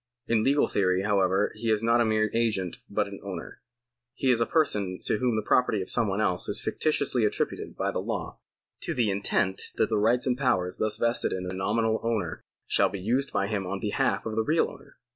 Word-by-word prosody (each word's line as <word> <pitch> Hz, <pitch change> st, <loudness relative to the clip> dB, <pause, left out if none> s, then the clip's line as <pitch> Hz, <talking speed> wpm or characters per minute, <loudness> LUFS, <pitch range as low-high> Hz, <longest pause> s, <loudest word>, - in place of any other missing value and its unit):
In 110 Hz, -2 st, +2 dB
legal 140 Hz, +3 st, +3 dB
theory, 95 Hz, -1 st, +1 dB
however, 100 Hz, -1 st, +2 dB
he 115 Hz, +1 st, -3 dB
is 110 Hz, 0 st, +1 dB
not 115 Hz, +1 st, +4 dB
a -, -, +3 dB
mere 110 Hz, -1 st, +1 dB
agent 110 Hz, -6 st, 0 dB
but -, -, 0 dB
an -, -, -9 dB
owner. -, -, -7 dB, 0.5 s
He 130 Hz, -, +2 dB
is 115 Hz, -2 st, +2 dB
a 115 Hz, -, +2 dB
person 105 Hz, -, 0 dB
to 105 Hz, -, 0 dB
whom 125 Hz, -3 st, +1 dB
the 110 Hz, -, -1 dB
property 125 Hz, -4 st, +2 dB
of 95 Hz, -, -2 dB
some 115 Hz, -3 st, +2 dB
one 95 Hz, +1 st, -1 dB
else 90 Hz, -5 st, +1 dB
is -, -, +1 dB
fictitiously 140 Hz, -6 st, 0 dB
attributed 105 Hz, -, -2 dB
by -, -, 0 dB
the -, -, -2 dB
law, -, -, -4 dB, 0.4 s
to -, -, -3 dB
the 115 Hz, -4 st, +2 dB
intent 95 Hz, -1 st, 0 dB
that -, -, +1 dB
the 110 Hz, -2 st, +1 dB
rights 120 Hz, +4 st, +3 dB
and 125 Hz, -2 st, +1 dB
powers 95 Hz, -9 st, 0 dB
thus 110 Hz, -1 st, 0 dB
vested 115 Hz, 0 st, +1 dB
in 90 Hz, -1 st, -4 dB
a 90 Hz, -, -4 dB
nominal 110 Hz, +4 st, 0 dB
owner 115 Hz, -2 st, -2 dB, 0.2 s
shall -, -, +3 dB
be 100 Hz, -, -6 dB
used 125 Hz, +8 st, 0 dB
by -, -, 0 dB
him 100 Hz, -2 st, -2 dB
on 95 Hz, +1 st, -3 dB
behalf 105 Hz, 0 st, 0 dB
of 110 Hz, -1 st, -3 dB
the 110 Hz, -, +2 dB
real 155 Hz, +8 st, +1 dB
owner. -, -, -16 dB
110 Hz, 220 wpm, -27 LUFS, 95-115 Hz, 0.5 s, not